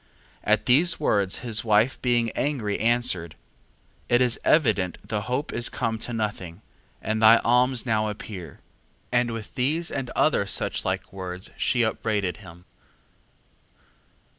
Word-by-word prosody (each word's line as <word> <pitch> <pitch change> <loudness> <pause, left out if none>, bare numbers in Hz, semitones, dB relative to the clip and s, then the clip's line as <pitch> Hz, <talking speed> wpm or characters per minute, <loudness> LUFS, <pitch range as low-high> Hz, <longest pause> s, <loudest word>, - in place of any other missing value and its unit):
2:22. - - +2
At - - +1
these 160 +8 +3
words 100 -9 +1
his 110 -3 +1
wife 110 +3 +2
being 120 -2 +1
angry 120 -9 -2
answered: 110 -8 +1 0.7
It 120 - +4
is 125 -2 +3
evident 105 - +2
the 105 -2 -2
hope 130 +4 -2
is 120 0 +1
come 115 -2 -2
to 120 - -4
nothing, 105 -5 -4 0.4
and 110 0 -1
thy 110 +1 +8
alms 125 +1 +2
now 110 -2 +1
appear. 95 -6 -8 0.5
2:23. 120 - +5
And 120 -1 -3
with 115 -2 -7
these 155 +7 0
and 135 -3 -4
other, 140 -10 +2
such - - -1
like - - -3
words 95 0 -7
she 120 -2 +1
upbraided 105 -5 -1
him. 85 +2 -14
115 Hz, 145 wpm, -25 LUFS, 100-125 Hz, 0.7 s, thy